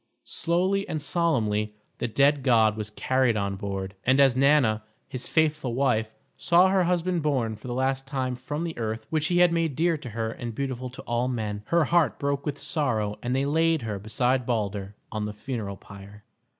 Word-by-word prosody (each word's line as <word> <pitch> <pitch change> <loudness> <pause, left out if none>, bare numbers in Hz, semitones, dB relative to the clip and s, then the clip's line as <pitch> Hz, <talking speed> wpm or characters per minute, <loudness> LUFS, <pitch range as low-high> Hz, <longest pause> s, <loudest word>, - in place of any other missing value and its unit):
Slowly 185 +4 +1
and 155 - -2
solemnly 115 -10 0 0.2
the - - -1
dead 140 +5 +3
god 115 -5 +4
was 110 -1 -4
carried 130 +1 +1
on 100 -1 -1
board, 95 -1 -4
and 130 +2 +3
as 135 -3 +5
Nanna, 130 -5 +3 0.3
his 130 -3 -6
faithful 150 -6 +1
wife, 110 -5 +1 0.2
saw 175 +2 +4
her 190 -2 +3
husband 180 0 0
borne 130 -7 0
for 110 - -11
the 120 - -3
last 135 +1 -1
time 130 -2 -2
from 145 +5 -4
the 165 -2 -4
earth 110 0 -3
which 155 -1 +1
he 175 - +1
had 175 -1 +5
made 165 -4 0
dear 165 +1 +1
to 125 - -8
her 110 0 -3
and 115 0 -6
beautiful 130 -1 -3
to 125 - -10
all 120 +1 -1
men, 110 -5 -3
her 170 -1 +3
heart 170 0 +2
broke 140 +1 -2
with 145 -1 -2
sorrow, 125 -9 -1
and 125 +1 -1
they 135 +1 +1
laid 160 0 +2
her 105 -3 -3
beside 125 +5 0
Balder 105 -4 -2 0.2
on 105 -1 -2
the 105 - -5
funeral 105 -3 -5
pyre. 100 +1 -13
130 Hz, 195 wpm, -26 LUFS, 110-150 Hz, 0.3 s, as